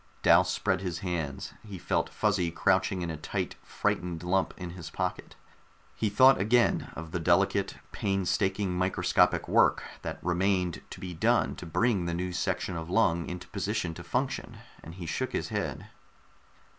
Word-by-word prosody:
Dal - - +7
spread 95 0 0
his 90 -3 -3
hands. 80 -6 -3
He 100 -3 -8
felt - - 0
Fuzzy 100 -5 +1
crouching 95 +2 +1
in 85 - -2
a 80 - -5
tight 75 - -3
frightened 90 -1 -2
lump 95 +2 +1
in 90 -2 -6
his 85 -2 -8
pocket. 90 +2 -4 0.6
He 110 - 0
thought 130 +5 +6
again 115 +4 +3
of 80 0 -7
the 90 - -2
delicate, 95 +3 +2 0.2
painstaking 95 0 0
microscopic 90 +1 +2
work - - +4 0.2
that - - -4
remained 90 0 +1
to - - -9
be 90 -1 -6
done 80 - +2
to 85 - -8
bring 100 +2 +1
the 85 0 -1
new 90 +1 -3
section 85 +1 -1
of 80 0 -5
lung 85 -1 +2
into 90 0 -6
position 80 - -2
to - - -9
function, - - -2 0.3
and 80 - -9
he 90 -2 -7
shook - - -2
his - - -2
head. - - -3
90 Hz, 165 wpm, -29 LUFS, 85-95 Hz, 0.6 s, Dal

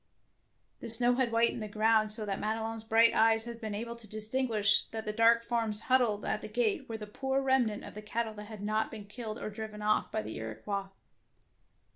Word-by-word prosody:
'' - - -44
The - - -5
snow 240 +2 +6
had 250 -1 +1
whitened 230 0 +2
the 215 - -4
ground, 215 +1 +2
so 215 0 -2
that 195 -1 -3
Madelon' 225 +1 -2
s 220 - -8
bright 225 +1 +5
eyes 225 0 +4
had 235 0 -8
been 215 -2 -4
able 235 +2 -5
to 230 -2 -8
distinguish 215 -1 +1
that 220 -1 -5
the 210 - -2
dark 230 +1 +5
forms 225 -3 -1
huddled 245 -5 +2
at - - -1
the - - -6
gate 400 - -1
were 225 - -3
the 210 - -7
poor 265 +6 -1
remnant 260 -6 +1
of - - -9
the 210 - -8
cattle 220 +1 -3
that 210 0 -9
had 210 -1 -9
not 215 +1 0
been 215 -2 -9
killed 215 +1 -6
or 215 - -5
driven 210 0 -7
off 215 0 +1
by - - -2
the 110 - -6
Iro 110 -1 -5
quois. 195 - -4
220 Hz, 225 wpm, -31 LUFS, 210-235 Hz, -, snow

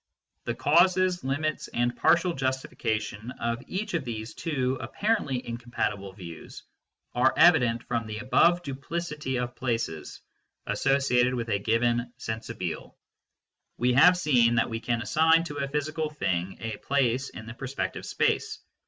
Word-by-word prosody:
The - - -2
causes, 180 +3 +3
limits 145 +4 -2
and 120 0 -1
partial 170 +1 +3
justification 120 -5 -2
of 115 0 -2
each 195 +2 -4
of 165 -4 0
these 115 -2 -5
two 130 -5 -1
apparently 140 - -1
incompatible 115 -4 -3
views 85 -4 -10 0.5
are 125 +2 +4
evident 125 -9 +5
from 115 -2 -2
the 110 0 -5
above 170 +9 +3
duplicity 150 0 -4
of 125 0 -3
places 115 - -3 0.5
associated 130 -2 +2
with 120 -1 -3
a 100 - +1
given 120 +3 +1
" - - -48
sensibile." 110 -6 -5 0.8
We 125 +1 +2
have 180 +8 +7
seen 120 -8 +3
that 115 0 +1
we 115 - -2
can 115 0 -1
assign 160 +3 +4
to 150 -4 -6
a 140 - -1
physical 150 +2 -2
thing 95 - -2
a 115 -1 -4
place 135 -1 0
in 110 - -10
the 115 - -8
perspective 135 +2 -4
space. - - 0
125 Hz, 145 wpm, -27 LUFS, 115-150 Hz, 0.8 s, have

